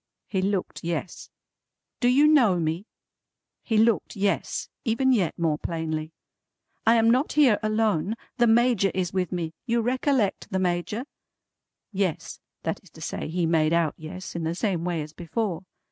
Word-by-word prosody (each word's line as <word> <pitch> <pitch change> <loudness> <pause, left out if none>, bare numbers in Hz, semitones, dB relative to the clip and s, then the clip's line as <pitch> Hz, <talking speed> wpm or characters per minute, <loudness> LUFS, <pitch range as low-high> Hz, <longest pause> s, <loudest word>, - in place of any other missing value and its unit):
He 190 - -1
looked 195 -1 -2
yes. 170 +1 -4 0.7
"Do 245 - +2
you 265 +4 +5
know 240 - +5
me?" 165 +6 -2 0.7
He 225 - 0
looked 225 +1 +2
yes, 200 0 -1 0.2
even 260 +2 +2
yet 190 -9 +1
more 160 -3 0
plainly. 160 -1 -3 0.8
"I 230 - +7
am 225 0 +4
not 260 +5 +1
here 275 -8 +5
alone. 215 -3 +1 0.2
The 240 - +4
Major 230 -3 +4
is 185 -1 -1
with 185 -2 -1
me. 170 -3 -3
You 235 0 +2
recollect 255 -3 0
the 190 - -1
Major?" 185 +6 -1 0.9
Yes. 190 -5 -2 0.2
That - - -2
is - - -19
to - - -15
say - - -4
he 170 +2 -1
made 160 -1 +2
out 170 -3 +2
yes, 165 +4 -8
in 170 - -3
the 165 +1 -1
same 185 -4 -1
way 170 -3 -1
as 150 +1 -11
before. 180 +1 -3
190 Hz, 160 wpm, -26 LUFS, 170-230 Hz, 0.9 s, I